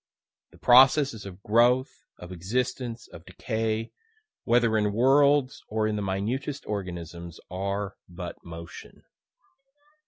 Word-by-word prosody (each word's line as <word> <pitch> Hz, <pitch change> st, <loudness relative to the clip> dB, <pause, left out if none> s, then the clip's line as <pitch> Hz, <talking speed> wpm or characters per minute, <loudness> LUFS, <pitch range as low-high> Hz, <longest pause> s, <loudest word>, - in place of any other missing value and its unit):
The -, -, -19 dB
processes 130 Hz, -3 st, +5 dB
of 95 Hz, +1 st, -12 dB
growth, 120 Hz, +4 st, +2 dB
of 90 Hz, -, -10 dB
existence, 120 Hz, +6 st, -3 dB
of -, -, -12 dB
decay, 110 Hz, 0 st, -3 dB, 0.5 s
whether 120 Hz, -1 st, +3 dB
in 105 Hz, -1 st, +1 dB
worlds, 135 Hz, +3 st, +3 dB
or 110 Hz, 0 st, 0 dB
in 110 Hz, 0 st, 0 dB
the 105 Hz, -, -2 dB
minutest 115 Hz, +9 st, -3 dB
organisms, 85 Hz, -4 st, -6 dB
are 100 Hz, +1 st, -3 dB
but 90 Hz, -1 st, -8 dB
motion." 85 Hz, 0 st, -11 dB
110 Hz, 115 wpm, -26 LUFS, 95-125 Hz, 0.5 s, processes